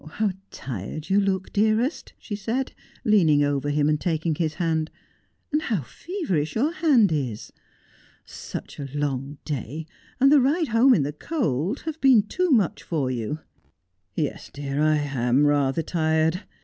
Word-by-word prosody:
How 215 -2 +1 0.2
tired 135 - -6
you 200 +1 +5
look, 190 -1 -1
dearest,' 220 +7 +1
she 205 - -6
said, 230 +6 -2 0.3
leaning 165 -9 +4
over 145 0 0
him 145 0 +2
and 150 -1 +1
taking 165 -1 0
his 155 -1 -2
hand, 160 -2 0 0.3
' - - -45
and 300 - +2
how 215 - -1
feverish 180 - -3
your 280 +8 +2
hand 290 - +4
is! 130 -8 -3 0.7
Such - - -8
a 140 -1 -5
long 140 -1 -2
day, 150 +2 -4 0.3
and 275 +2 +6
the 295 -2 +7
ride 300 +5 +1
home 240 +3 +5
in 150 - +2
the 145 +2 -3
cold, 195 - -1
have 320 -1 -6
been 255 -6 +6
too 365 - -1
much 220 - +2
for 140 -6 -1
you.' 125 +6 -3 0.4
' - - -50 0.3
Yes, 150 -3 -3
dear, 140 0 -3
I 155 0 +4
am 140 -2 +1
rather 145 +1 +2
tired. 160 +2 +1
160 Hz, 160 wpm, -24 LUFS, 145-225 Hz, 0.7 s, the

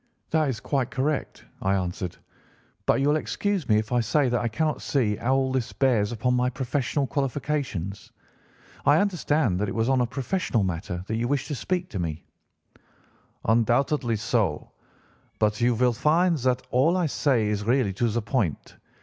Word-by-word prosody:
"'That 155 -3 +2
is 120 -5 -3
quite 135 -3 -1
correct,' 135 +4 -2 0.2
I 95 +1 +2
answered; 90 -1 -3 0.7
'but - - +4
you 140 +2 +2
will 150 - +3
excuse 195 0 -2
me 105 - +5
if 110 0 -2
I 125 - +3
say 130 +4 +2
that 120 0 +1
I 120 - 0
cannot 150 +7 -1
see 115 -7 +1
how 130 +3 +1
all 135 -1 +1
this 130 -3 -1
bears 120 -6 +2
upon 120 +2 0
my 125 0 +2
professional 135 +2 -1
qualifications. 135 - -3 0.7
I 145 - +5
understand 155 - +1
that 105 0 0
it - - -5
was 115 +2 +1
on 130 -1 +3
a 120 - +1
professional 135 - -1
matter 90 0 -3
that 110 +2 -2
you 120 +1 0
wished 140 +2 -1
to - - -2
speak 180 +7 -2
to 95 - -3
me?' 80 -2 -4 1.2
"'Undoubtedly 120 +3 +2
so. 105 0 -1 0.7
But 105 +1 +1
you 120 0 +3
will 125 +1 +3
find 165 +8 +3
that 130 0 0
all 150 +9 +3
I 180 - +1
say 130 -7 +1
is 105 -1 -1
really 120 -3 +1
to 120 +5 0
the 115 +1 -1
point. 100 - -2
125 Hz, 180 wpm, -26 LUFS, 110-145 Hz, 1.2 s, me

